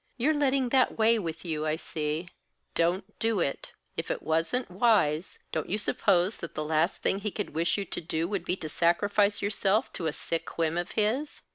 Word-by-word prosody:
"You're 280 +6 +3
letting 275 -3 +2
that 260 0 +3
weigh 225 +1 +4
with 170 -2 -5
you, 155 -2 -1
I 155 - +1
see. 160 +1 -3 0.4
Don't 175 +3 0
do 225 -3 +1
it! 140 - -2 0.2
If - - -3
it - - -2
wasn't 165 +9 0
wise, 185 -6 +2
don't - - -2
you 200 - +1
suppose 200 -2 +2
that 170 - -7
the 155 - -2
last 160 +3 +1
thing 195 - +2
he 210 +1 -2
could 205 0 -4
wish 165 +4 +1
you 200 - -2
to - - -5
do 160 0 -1
would 195 -2 -2
be 180 - 0
to 160 - -6
sacrifice 200 +6 +2
yourself 205 +3 +1
to 165 - -2
a - - +1
sick 165 +2 -4
whim 165 -1 +1
of 175 0 -2
his?" 230 +8 0
185 Hz, 205 wpm, -28 LUFS, 165-215 Hz, 0.4 s, weigh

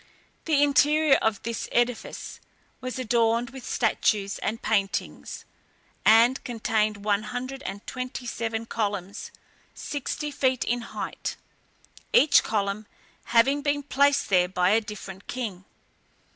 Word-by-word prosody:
The 295 -3 +3
interior 295 +1 +4
of 215 -3 0
this 230 0 -4
edifice 240 -1 -1 0.4
was 255 0 -5
adorned 235 -1 +1
with 265 -1 -10
statues 210 -4 0
and 225 +1 -2
paintings, 200 -3 -2 0.6
and 230 +4 +5
contained 215 -3 -1
one 205 -1 +2
hundred 255 +4 -5
and 200 +1 -6
twenty 255 0 -5
seven 230 -1 -3
columns, 205 -4 -3 0.5
sixty 295 +1 -4
feet 260 -3 +1
in 240 +1 -1
height, - - -5 0.8
each 295 0 +6
column 205 0 -2 0.4
having 270 +5 +3
been 285 0 0
placed 280 +1 +2
there 180 -2 +4
by 180 0 +2
a 225 +2 +4
different 200 -2 -9
king. 210 -7 -5
230 Hz, 120 wpm, -26 LUFS, 210-260 Hz, 0.8 s, each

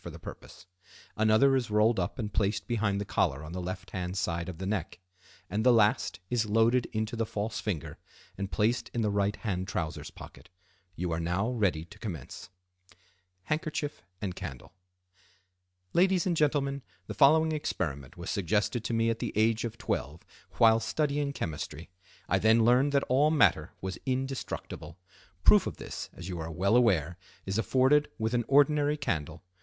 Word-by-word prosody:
for - - -6
the - - -9
purpose; 90 - -11 0.5
another 110 +5 +4
is 125 -4 0
rolled 105 +1 +3
up 90 - -2
and 110 -4 -4
placed 100 -1 0
behind 105 -4 0
the 100 - -3
collar 75 -7 0
on 75 - -8
the 90 - -4
left 90 +1 -6
hand 90 +1 -4
side 85 -1 -2
of 90 - -7
the 95 - -5
neck; 95 -4 -3 0.5
and 105 +3 -1
the 125 - +6
last 105 -5 +2
is 115 -3 +1
loaded 115 +3 +3
into 110 +1 -3
the 115 - 0
false 110 0 -3
finger 90 -9 -4 0.4
and 100 0 -5
placed 115 +4 +1
in 120 - +1
the 105 - +1
right 100 0 +1
hand 95 -4 -3
trousers 85 -4 -4
pocket. - - -13 0.5
You 90 0 -3
are 80 - -1
now 90 +7 0
ready 95 -10 0
to 105 +4 -16
commence. 90 - -7 0.9
Handkerchief 150 +3 -3 0.2
and 95 -3 -4
Candle.—"Ladies 90 - -4
and 180 -2 +1
Gentlemen, 140 -2 +1 0.2
the - - -6
following 160 +3 +5
experiment 75 - -3
was 85 +2 -5
suggested 105 +4 0
to 115 - -1
me 115 0 +2
at 115 - -4
the - - -3
age 110 +2 +2
of 115 0 -5
twelve 75 +4 -3 0.3
while 115 -1 +5
studying 145 +4 -1
chemistry. 80 - -5 0.4
I - - +2
then 110 +1 +4
learned 125 +4 +4
that 140 - +3
all 140 +4 +3
matter 150 -6 +3
was 95 -1 -5
indestructible. 130 - -4 0.5
Proof - - +6
of - - -5
this, - - -7
as 90 - -9
you 90 -3 -4
are 80 0 -4
well 95 +6 +1
aware, 90 -8 +2 0.3
is 95 +3 -1
afforded 135 +5 +3
with 110 +1 -1
an 120 -2 +1
ordinary 145 +1 +4
candle. 80 - -3
105 Hz, 170 wpm, -29 LUFS, 90-125 Hz, 0.9 s, the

